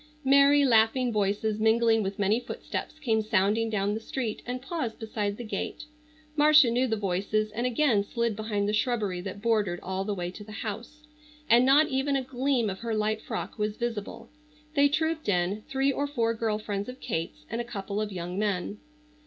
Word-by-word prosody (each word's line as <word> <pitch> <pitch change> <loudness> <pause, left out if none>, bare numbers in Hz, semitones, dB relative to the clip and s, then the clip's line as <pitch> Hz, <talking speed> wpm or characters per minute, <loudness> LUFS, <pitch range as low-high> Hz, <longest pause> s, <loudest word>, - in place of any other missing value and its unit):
Merry, 280 +1 +6
laughing 240 +1 +3
voices 210 +1 0
mingling 225 0 +3
with 195 0 -3
many 205 +2 +2
footsteps 280 - -6
came 225 -8 +1
sounding 215 +1 +1
down 205 -1 0
the 220 - -2
street 225 -1 -4
and 250 +1 -3
paused 265 -4 -4
beside 210 -2 -3
the 240 - -6
gate. 235 +6 -4 0.5
Marcia 300 -4 +6
knew 250 +2 +2
the 220 -2 0
voices 205 +2 -1
and 235 +4 -1
again 245 -5 +2
slid 235 +1 -1
behind 210 -1 -1
the 210 - 0
shrubbery 215 -5 0
that 200 +2 -7
bordered 210 -6 +1
all 190 +1 -2
the 205 0 -2
way 175 -1 -4
to 210 - -10
the 215 +1 -11
house, 230 +8 -6 0.4
and 240 +2 +5
not 295 +3 +6
even 275 +1 0
a 270 - 0
gleam 255 -2 0
of 190 -1 -4
her 230 -1 -2
light 215 0 0
frock - - -5
was 210 0 -1
visible. 230 -4 -5 0.4
They 285 -1 +4
trooped 315 -1 -1
in, 185 +2 +1
three 270 +1 +2
or 285 +2 -1
four 230 -5 0
girl 220 -2 -1
friends 205 0 -4
of 255 - -9
Kate's 165 -8 -4
and 230 +6 -3
a - - -3
couple 205 -3 -4
of 210 -1 -3
young 180 0 -4
men. 205 0 -1
220 Hz, 195 wpm, -28 LUFS, 205-250 Hz, 0.5 s, Merry